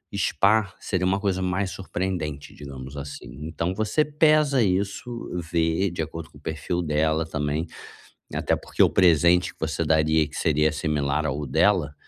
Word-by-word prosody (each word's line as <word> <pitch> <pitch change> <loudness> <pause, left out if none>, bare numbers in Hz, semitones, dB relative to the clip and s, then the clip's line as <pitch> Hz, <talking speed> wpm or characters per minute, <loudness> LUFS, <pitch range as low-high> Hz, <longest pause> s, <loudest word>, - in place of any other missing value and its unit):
Spa 100 +1 +2
seria 90 -2 -1
uma 95 +1 +1
coisa 95 -2 -1
mais 95 +1 -1
surpreendente, 85 -6 -4
digamos 70 -1 -9
assim. 70 -3 -7 0.2
Então, 85 +2 -2
você 110 +9 +1
pesa 150 -2 +3
isso, 100 +4 -1 0.4
vê 85 +3 +1
de 85 - -3
acordo 80 +1 -7
com - - -16
o - - -24
perfil 80 +2 -3
dela 80 +1 +1
também, 75 +1 -2 0.7
até - - +1
porque - - 0
o - - +5
presente 90 -1 +4
que - - -35
você 80 +1 -1
daria 80 0 +3
e - - -8
que 75 - -11
seria 75 -1 +2
similar 75 -1 -1
ao 75 0 -2
dela 85 -4 +2
85 Hz, 165 wpm, -25 LUFS, 75-95 Hz, 0.7 s, o